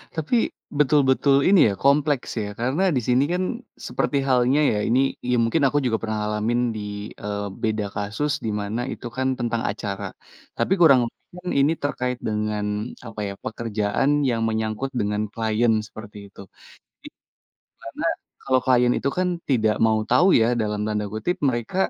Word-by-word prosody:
Tapi, 180 +9 +1 0.3
betul-betul 140 -1 +4
ini 195 -1 +6
ya, - - -1
kompleks 140 +3 +2
ya 105 - -4
karena 130 +10 0
di 125 - +1
sini 125 +2 +4
kan 180 +1 0 0.4
seperti 145 - -1
halnya 130 +2 +3
ya 105 - 0
ini, 120 +3 +3 0.3
ya 125 - +3
mungkin 130 +8 +1
aku 140 +2 +2
juga 115 -3 +1
pernah 110 -1 -2
ngalamin 105 +3 0 0.2
di, 110 - -4 0.4
eee, 105 0 -3 0.2
beda 110 -1 0
kasus 105 +9 -2
di - - 0
mana 105 +4 -3
itu - - -11
kan 130 0 +1
tentang 120 -1 -1
acara, 100 -1 -5 0.5
tapi - - +1
kurang 140 -6 +7
lebih 115 - -9 0.2
kan 180 - -5
ini 140 +3 +4
terkait 125 -3 -1
dengan 105 -1 -1 0.4
apa 115 -2 -8
ya, 100 - -4
pekerjaan 110 +2 -1 0.2
yang 115 -2 0
menyangkut 110 +3 -2
dengan 105 0 0
klien 115 +1 +1
seperti 105 -1 -11
itu. 100 - -13 0.7
I - - -6 0.7
karena - - -6 0.4
kalau 130 -1 +2
klien 125 -1 +4
itu - - -1
kan 185 0 +2 0.2
"tidak 110 -4 +3
mau 110 -1 +2
tahu 180 - +5
ya" 110 - +4 0.2
dalam 105 -1 -2
tanda 105 -1 -1
kutip, 110 +12 -2
mereka 120 +5 -3
115 Hz, 165 wpm, -23 LUFS, 105-135 Hz, 0.7 s, kurang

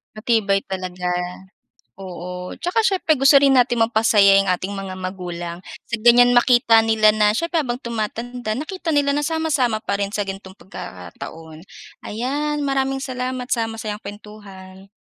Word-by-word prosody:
Matibay 215 -3 +1
talaga, 185 -1 -4 0.9
oo. 180 0 -7
Tsaka 360 +6 0
siyempre 380 -6 +2
gusto 275 0 +6
rin 275 -1 +4
natin 245 -1 +3
mapasaya 215 -3 +4
'yong 195 - -1
ating 185 +2 -2
mga 195 -1 -6
magulang 175 -2 -6 0.2
sa - - -2
ganyan 245 +1 +6
makita 240 -2 +5
nila 220 -1 +3
na 210 -1 +3
siyempre, 335 +8 0
habang 245 -3 -3
tumatanda 235 -1 -4
nakita 335 +3 -4
nila 285 -2 +2
na 295 - 0
sama-sama 295 -7 0
pa 200 -2 -3
rin 200 - -2
sa 205 -1 -3
ganitong 195 0 -8
pagkataon. 160 - -10 0.4
Ayan, 285 +7 -2
maraming 270 0 0
salamat 255 -1 -4
sa 225 -2 -2
masayang 215 -1 -6
kuwentuhan. 200 -2 -12
220 Hz, 145 wpm, -21 LUFS, 195-260 Hz, 0.9 s, gusto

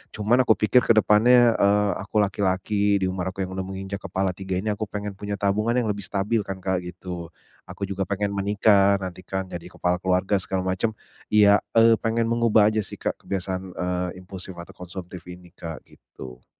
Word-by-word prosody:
cuman 120 +4 +2
aku 110 - +6
pikir 110 +4 +4
ke 115 - +5
depannya, 115 +3 +5
eee, 100 0 +3 0.2
aku 105 -1 +2
laki-laki 100 +1 0
di - - +3
umur 95 0 -3
aku 95 - -2
yang 95 - -6
udah 95 0 -4
menginjak 95 +1 -5
kepala 95 0 -1
3 95 +1 -5
ini 105 +2 -1
aku 105 0 -3
pengen 105 0 -5
punya 100 +1 -4
tabungan 105 +4 0
yang 110 -3 0
lebih 100 -1 -5
stabil 105 +3 0
kan 95 -1 -6
Kak 95 -1 0
gitu, 90 -1 -7 0.4
aku 100 - -8
juga 100 0 -2
pengen 100 0 -1
menikah 100 0 +3
nanti 90 0 -6
kan 95 0 -3
jadi 85 0 -7
kepala 90 0 0
keluarga 95 +2 +1
segala 95 -1 -2
macam 95 +4 0 0.4
iya, 105 -1 +7 0.2
eee, 115 0 +7
pengen 115 0 0
mengubah 115 -3 +4
aja 110 0 0
sih - - -9
Kak - - -2
kebiasaan, 95 -1 -3
eee, 90 0 -2
impulsif 95 0 -8
atau 85 - -11
konsumtif 90 -1 -8
ini 90 0 -11
Kak, 80 -1 -7
gitu. 65 -1 -13
100 Hz, 190 wpm, -24 LUFS, 95-105 Hz, 0.4 s, iya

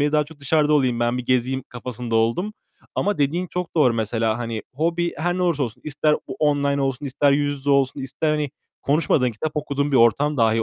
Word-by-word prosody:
beri. 145 +1 +1
Daha 150 -1 +3
çok 155 0 -15
dışarıda 150 +2 +2
olayım, 130 -5 +2
ben 120 +1 +1
bir 125 - -4
gezeyim 130 +1 +1
kafasında 120 -1 -4
oldum. 115 - +1 0.4
Ama 205 0 0
dediğin 155 +6 0
çok 180 -1 -5
doğru 130 -7 +4
mesela, 110 0 0
hani, 115 -3 -4
hobi 170 +3 0
her 175 +3 -1
ne 185 - -1
olursa 170 -5 +1
olsun. 125 0 -5
İster 150 0 +1
o - - -6
online 140 -2 +1
olsun, 135 0 -1
ister 140 +1 +2
yüz 145 0 0
yüze 140 +1 -1
olsun, 140 0 +2
ister, 140 +4 -2
hani, 150 -2 -1 0.3
konuşmadığın, 145 -3 +2
kitap 150 +8 -4
okuduğun 145 -1 -1
bir - - +4
ortam 135 +6 +3
dahi 115 -2 +3
140 Hz, 210 wpm, -22 LUFS, 125-150 Hz, 0.4 s, doğru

